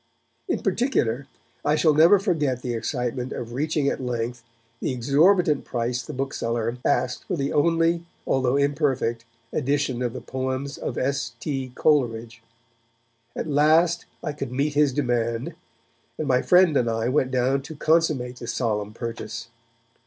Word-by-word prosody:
In - - -1
particular 140 - 0 0.4
I 150 - +2
shall 155 0 +4
never 165 +7 +7
forget 150 - 0
the 125 - -2
excitement 125 +1 -3
of 120 0 -6
reaching 150 +2 0
at 140 - -1
length 120 -1 -3 0.4
the - - -1
exorbitant 150 +5 +3
price 120 +1 -2
the - - -8
bookseller 120 -3 -2
asked 125 +1 0
for 185 - -2
the 140 -1 -1
only, 165 +2 +2 0.2
although 130 -1 +1
imperfect, 140 -5 0 0.3
edition 140 -3 0
of 120 -2 -1
the - - -5
poems 130 +2 -4
of 120 - -4
S. 140 +1 -1
T. 135 -4 -3
Coleridge. 115 -6 +1 0.9
At - - -3
last 160 +3 +3 0.2
I - - -2
could 140 -4 -5
meet 140 +3 0
his 145 -1 +3
demand, 120 -3 -1 0.6
and 155 - -3
my 125 -2 +3
friend 180 -4 +5
and 120 -3 +2
I 115 0 -1
went 130 0 +2
down 130 +1 +1
to 155 +4 -9
consummate 150 -6 +1
the 120 - -8
solemn 105 -4 -2
purchase. 115 -1 -6
135 Hz, 150 wpm, -24 LUFS, 120-150 Hz, 0.9 s, never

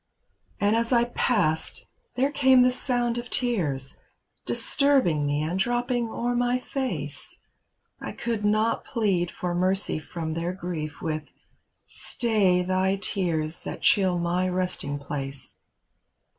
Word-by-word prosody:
And 205 +2 +3
as 230 +1 0
I 235 -1 +5
passed 205 -9 0 0.3
there 270 +3 +2
came 265 -3 +5
the 250 - +4
sound 245 -2 0
of 240 - -8
tears, 155 - -1 0.5
Disturbing 255 - +2
me 145 +1 0
and 170 +4 -2
dropping 240 +2 0
o'er 240 +2 -1
my 245 +1 +1
face; 175 - -3 0.6
I - - -5
could 230 -3 -3
not 215 +2 +2
plead 190 -6 0
for 175 0 -3
mercy 185 -1 0
from 160 +1 -5
their 170 +2 -2
grief 165 -5 -5
With 155 -1 -2 0.6
"Stay 200 -6 +2
thy 185 +1 +1
tears 170 -5 -1
that - - -6
chill 190 -4 +4
my 175 +2 0
resting 180 -6 -1
place." 135 -2 -5
190 Hz, 130 wpm, -26 LUFS, 160-240 Hz, 0.6 s, I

